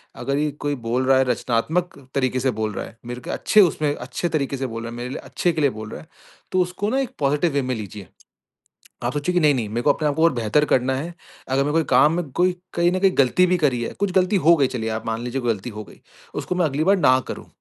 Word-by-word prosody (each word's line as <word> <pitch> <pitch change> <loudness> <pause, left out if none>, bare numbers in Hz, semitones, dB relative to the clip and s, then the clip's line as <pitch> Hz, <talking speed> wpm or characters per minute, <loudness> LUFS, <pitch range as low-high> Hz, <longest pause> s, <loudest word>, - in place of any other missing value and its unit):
अगर 140 0 -2
ये 150 0 +1 0.2
कोई 145 0 0
बोल 120 +1 -1
रहा 135 0 +5
है 130 - +4
रचनात्मक 130 +9 -1 0.2
तरीके 130 -2 +1
से 130 +1 +1
बोल 110 -1 -3
रहा - - -4
है, 115 - -14
मेरे 120 +1 -6
क - - -5
अच्छे 215 - +4
उसमें 155 -5 +2
अच्छे 140 +7 -4
तरीके 140 -3 -1
से 135 0 -2
बोल 115 -1 -6
रहा 115 - -6
है, 120 - -8
मेरे 120 +1 -5
लिए 130 - -5
अच्छे 175 - -1
के 155 - -2
लिए 140 - +4
बोल 110 -3 -8
रहा - - -7
है। - - -17 0.4
तो 185 - +3
उसको 180 +3 -2
ना 265 +4 +1
एक 265 - -1
पॉजिटिव 150 +4 +1
वे 140 - +2
में 130 0 -2
लीजिए। 100 -3 -8 1.0
आप 120 - 0
सोचिए 145 +5 -1
कि 180 - +3
नहीं-नहीं 140 -8 +2
मेरे 115 +3 -2
को 145 - +4
अपने 150 0 -1
को 160 +2 +2
और 165 - +5
बेहतर 120 +4 +1
करना 130 -1 +2
है। 165 +6 -5 0.3
अगर 135 +1 +2
मेरे 145 - -1
कोई 165 +1 +2
काम 150 +2 +5
में 170 -4 -3
कोई 180 +4 +2 0.2
कहीं 175 +1 +2
न 185 - 0
कहीं 195 0 +5
गलती 140 +7 +4
भी 180 0 +2
करी 135 -7 +1
है, - - -3
कुछ 200 -2 0
गलती 190 +2 +2
हो 170 -1 +5
गई 140 -4 +3
चलिए 115 -3 -3
आप 110 0 -4
मान 115 0 -2
लीजिए 125 +2 -3
कोई 120 -2 +1
गलती 105 +4 -8
हो 105 -1 -7
गई, - - -17 0.3
उसको - - -3
मैं 180 -1 +1
अगली 150 +1 -1
बार 195 +3 +4
ना 130 -6 +5
करूँ, - - -6
140 Hz, 275 wpm, -22 LUFS, 120-170 Hz, 1.0 s, रहा